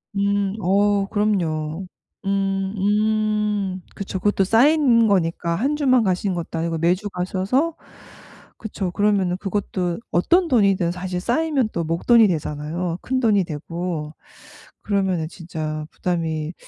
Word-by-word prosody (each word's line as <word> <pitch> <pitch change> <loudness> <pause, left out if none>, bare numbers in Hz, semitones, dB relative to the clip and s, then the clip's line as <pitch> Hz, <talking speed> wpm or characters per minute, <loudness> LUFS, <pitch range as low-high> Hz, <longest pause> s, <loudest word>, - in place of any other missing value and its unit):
음. 200 0 0
어 200 +2 +2
그럼요. 175 -5 -1 0.4
음. 195 0 0
음. 210 -1 0
그쵸. 195 -1 -4
그것도 205 0 +2
쌓인 240 +2 +4
거니까 170 -3 +1
1 270 - 0
주만 255 -5 +3
가시는 185 0 0
것도 170 -1 -5
아니고 165 0 -1
매주 180 +6 +1
가셔서 195 - -1 0.8
그쵸. 200 -3 -4
그러면은 195 -3 +1
그것도 190 -3 -2
어떤 345 - +3
돈이든 200 - +3
사실 180 0 -4
쌓이면 270 - +1
또 170 - -1
목돈이 210 +8 +4
되잖아요. 165 +1 -3
큰돈이 230 -6 +2
되고. 165 0 -5 0.7
그러면은 190 -5 0
진짜 155 -3 -5
부담이 165 -2 -2
195 Hz, 265 characters per minute, -22 LUFS, 170-210 Hz, 0.8 s, 쌓인